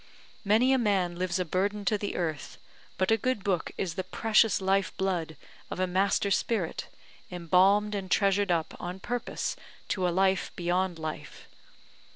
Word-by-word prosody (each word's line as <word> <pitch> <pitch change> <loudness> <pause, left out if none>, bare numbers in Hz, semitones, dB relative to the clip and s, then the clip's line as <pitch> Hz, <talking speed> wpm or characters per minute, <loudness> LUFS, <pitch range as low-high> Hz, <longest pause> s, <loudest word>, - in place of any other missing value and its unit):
Many 225 +6 +4
a 265 - +3
man 195 -6 +1
lives 180 0 -1
a 180 - -1
burden 200 +4 -1
to 215 - +2
the 205 -1 -3
earth; 160 -5 -3 0.4
but 190 +3 +1
a 225 - +5
good 255 -2 -1
book 185 -4 0
is 180 -4 -2
the 185 +2 -3
precious 220 +3 +2
life 195 0 0
blood 175 -5 -2 0.3
of - - -5
a 185 - +2
master 195 +2 +1
spirit, 195 -4 -1 0.4
embalmed 190 +4 +3
and 195 -2 -4
treasured 200 0 +2
up 165 -2 0
on 180 +2 -5
purpose 245 +4 -3 0.3
to 185 -2 0
a - - +2
life 190 +2 +1
beyond 180 0 0
life. 155 -1 -7
190 Hz, 165 wpm, -28 LUFS, 180-205 Hz, 0.4 s, a